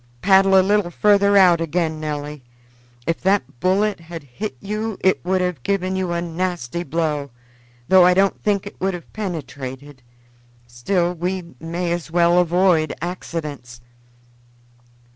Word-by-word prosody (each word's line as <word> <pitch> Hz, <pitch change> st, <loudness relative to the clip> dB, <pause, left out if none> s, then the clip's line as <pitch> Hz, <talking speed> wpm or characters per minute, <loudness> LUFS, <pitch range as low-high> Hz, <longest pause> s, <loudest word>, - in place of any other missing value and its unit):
"Paddle 195 Hz, 0 st, +5 dB
a 185 Hz, -, +3 dB
little 205 Hz, -2 st, +2 dB
further 200 Hz, +2 st, +3 dB
out 180 Hz, -3 st, +5 dB
again, 160 Hz, -1 st, -1 dB
Nelly. 150 Hz, -2 st, -5 dB, 0.6 s
If 165 Hz, -, -2 dB
that 185 Hz, -10 st, 0 dB
bullet 195 Hz, +3 st, +1 dB
had 165 Hz, -1 st, -9 dB
hit 165 Hz, -, -6 dB
you 215 Hz, +1 st, -4 dB
it 190 Hz, -, +2 dB
would 185 Hz, +1 st, 0 dB
have 180 Hz, -7 st, -2 dB
given 190 Hz, +3 st, -1 dB
you 185 Hz, -2 st, -2 dB
a 170 Hz, 0 st, -1 dB
nasty 170 Hz, -3 st, -3 dB
blow, 150 Hz, -3 st, -2 dB, 0.6 s
though 190 Hz, -1 st, +6 dB
I 180 Hz, 0 st, +5 dB
don't 195 Hz, +1 st, +2 dB
think 205 Hz, -2 st, 0 dB
it 200 Hz, -, -11 dB
would 190 Hz, 0 st, 0 dB
have 175 Hz, -, -12 dB
penetrated; 145 Hz, -8 st, -6 dB, 0.6 s
still 170 Hz, +10 st, -1 dB
we 180 Hz, 0 st, -4 dB
may 170 Hz, +2 st, -3 dB
as 170 Hz, -1 st, -3 dB
well 170 Hz, +1 st, +3 dB
avoid 175 Hz, -2 st, +2 dB
accidents." 155 Hz, -8 st, -6 dB
175 Hz, 140 wpm, -21 LUFS, 160-190 Hz, 0.6 s, though